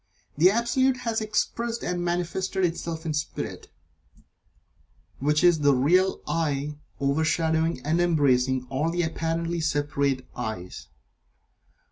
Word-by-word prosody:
The 170 Hz, +5 st, +6 dB
Absolute 250 Hz, +4 st, +2 dB
has 225 Hz, -1 st, 0 dB
expressed 230 Hz, +2 st, -1 dB
and 175 Hz, 0 st, -2 dB
manifested 180 Hz, +2 st, -1 dB
itself 165 Hz, -1 st, -3 dB
in 155 Hz, -, -1 dB
Spirit, 150 Hz, -1 st, -4 dB, 1.5 s
which 150 Hz, +2 st, +1 dB
is 175 Hz, -3 st, +5 dB
the 145 Hz, -2 st, +4 dB
real 180 Hz, +9 st, +3 dB
"I" 150 Hz, -2 st, -1 dB, 0.2 s
overshadowing 160 Hz, +1 st, +1 dB
and 165 Hz, +3 st, +2 dB
embracing 130 Hz, -6 st, +2 dB
all 145 Hz, +5 st, 0 dB
the 175 Hz, +1 st, 0 dB
apparently 165 Hz, +1 st, -2 dB
separate 140 Hz, -4 st, 0 dB
"I"s. 110 Hz, -7 st, -6 dB
160 Hz, 110 wpm, -26 LUFS, 145-175 Hz, 1.5 s, The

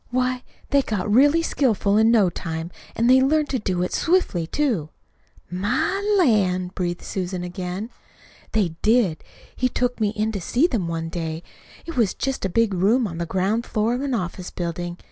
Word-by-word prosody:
Why, 255 Hz, 0 st, 0 dB, 0.3 s
they 280 Hz, -1 st, +5 dB
got 210 Hz, -5 st, -2 dB
really 290 Hz, +7 st, +5 dB
skillful 220 Hz, -10 st, +1 dB
in 220 Hz, +1 st, +5 dB
no 210 Hz, -6 st, +4 dB
time, 165 Hz, 0 st, -5 dB, 0.2 s
and 230 Hz, -, +2 dB
they 260 Hz, +1 st, +6 dB
learned 300 Hz, +2 st, +2 dB
to 260 Hz, -, 0 dB
do 185 Hz, -4 st, -1 dB
it 180 Hz, -, -3 dB
swiftly, 325 Hz, -, +1 dB
too." 220 Hz, -, 0 dB, 0.6 s
"My 300 Hz, -, 0 dB, 0.2 s
lan'!" 190 Hz, -, +2 dB
breathed 175 Hz, -1 st, -3 dB
Susan 180 Hz, -1 st, -3 dB
again. 180 Hz, +5 st, -5 dB, 0.6 s
"They 210 Hz, -5 st, +2 dB
did. 215 Hz, -8 st, +2 dB, 0.3 s
He 255 Hz, -, +1 dB
took 245 Hz, 0 st, -1 dB
me 215 Hz, -2 st, +2 dB
in 215 Hz, +1 st, -1 dB
to 200 Hz, -3 st, -4 dB
see 250 Hz, -, +2 dB
them 225 Hz, -, 0 dB
one 165 Hz, -1 st, -3 dB
day. 165 Hz, -1 st, -4 dB, 0.4 s
It 330 Hz, -3 st, -7 dB
was 220 Hz, -6 st, +2 dB
just 270 Hz, -6 st, -2 dB
a -, -, 0 dB
big 225 Hz, +2 st, +2 dB
room 210 Hz, +7 st, +3 dB
on 170 Hz, -4 st, -5 dB
the 170 Hz, -, -2 dB
ground 195 Hz, +6 st, 0 dB
floor 225 Hz, 0 st, 0 dB
of 250 Hz, -, -2 dB
an 275 Hz, -3 st, -1 dB
office 180 Hz, -2 st, -4 dB
building. 175 Hz, 0 st, -4 dB
210 Hz, 185 wpm, -23 LUFS, 180-250 Hz, 0.6 s, they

